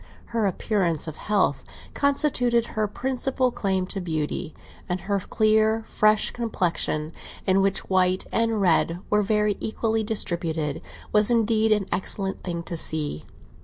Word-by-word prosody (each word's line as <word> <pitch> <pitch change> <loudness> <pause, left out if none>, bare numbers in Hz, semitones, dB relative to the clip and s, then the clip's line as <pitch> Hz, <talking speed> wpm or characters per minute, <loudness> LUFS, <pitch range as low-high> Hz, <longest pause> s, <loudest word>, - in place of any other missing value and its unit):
Her 225 -3 +2
appearance 180 -4 -1
of 155 - -6
health 200 -9 0 0.3
constituted 255 -5 +2
her 215 -1 0
principal 255 +3 -1
claim 190 -4 -1
to 195 - -3
beauty, 155 -2 -3 0.3
and 180 0 -2
her 200 0 -1
clear, 220 +2 +2
fresh 215 -1 +3
complexion, 170 -8 -1 0.3
in 190 +1 +3
which 195 0 0
white 185 0 +2
and 225 -1 +1
red 170 -2 +2
were 210 0 +4
very 210 0 +1
equally 220 0 -1
distributed, 165 -8 -1 0.3
was, 210 +1 +4
indeed, 225 -1 +2
an 210 -2 +3
excellent 195 0 -3
thing 170 -2 -3
to 170 - -4
see. 155 - +1
205 Hz, 135 wpm, -25 LUFS, 175-220 Hz, 0.3 s, were